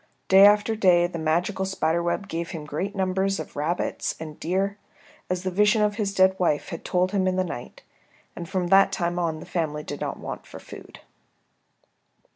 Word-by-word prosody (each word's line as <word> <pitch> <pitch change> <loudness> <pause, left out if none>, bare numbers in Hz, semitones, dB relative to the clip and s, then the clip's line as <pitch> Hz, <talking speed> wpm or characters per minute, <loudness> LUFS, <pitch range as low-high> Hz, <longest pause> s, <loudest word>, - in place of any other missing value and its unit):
Day 195 +1 +9
after 210 +2 +3
day 180 -5 +4
the 175 -1 -4
magical 175 +5 0
spider 170 -3 0
web 175 +4 -2
gave 170 -2 -4
him 155 -3 -6
great 185 +8 -4
numbers 190 +1 0
of - - -8
rabbits 155 +5 -2
and 155 -1 -8
deer, 195 +3 -1 0.5
as 180 0 -2
the 185 - -2
vision 210 +3 +3
of 210 0 0
his 205 -3 -1
dead 190 -1 +4
wife 160 -5 0
had 165 - -7
told 180 +1 0
him 190 -2 +1
in 185 - +1
the 185 - +1
night, 165 -9 -8 0.5
and 170 0 -7
from 185 -3 -1
that 195 +1 +6
time 175 -2 -1
on 165 -2 -1
the - - -10
family 150 -3 -2
did 145 - -7
not - - -3
want - - -7
for - - -10
food. - - -12
185 Hz, 195 wpm, -25 LUFS, 170-195 Hz, 0.5 s, Day